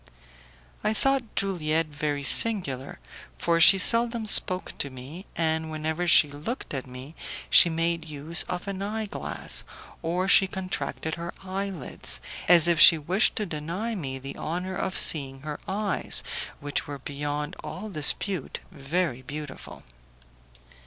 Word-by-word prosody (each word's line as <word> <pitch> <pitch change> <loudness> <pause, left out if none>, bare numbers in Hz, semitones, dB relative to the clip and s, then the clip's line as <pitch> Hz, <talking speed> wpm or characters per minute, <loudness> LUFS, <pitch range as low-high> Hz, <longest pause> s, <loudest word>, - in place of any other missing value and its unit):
I 215 +1 0
thought 270 -2 0
Juliette 165 -5 0
very 145 -1 -3
singular, 140 - +2 0.4
for 170 -1 +1
she 195 +4 +8
seldom 230 +3 +1
spoke 185 -3 +4
to 140 - 0
me, 135 +9 -10
and 160 -1 -1
whenever 155 +3 -3
she 165 -3 +7
looked 155 - -6
at 135 -2 -5
me 130 +4 -10 0.4
she 170 - +8
made 165 0 -2
use 150 +3 +2
of 180 +2 -4
an 195 -1 -4
eye 215 +2 -3
glass, 205 - -3 0.4
or 175 +3 -1
she 195 0 +6
contracted 185 -4 -4
her 170 - -6
eye 195 +1 -3
lids, 125 - -1 0.3
as 170 -2 +7
if 170 -2 +2
she 165 - +9
wished 180 +8 +1
to 215 - -2
deny 170 +8 -4
me 135 -10 -4
the 135 +1 -8
honour 180 +4 -4
of 185 - -2
seeing 135 -3 +1
her 150 0 -6
eyes, 205 +1 +1 0.4
which 145 0 -3
were 145 -1 -6
beyond 145 +3 -4
all 210 +4 -7
dispute 185 +2 -1
very 150 -3 -2
beautiful. 145 0 -9
165 Hz, 145 wpm, -26 LUFS, 145-190 Hz, 0.4 s, she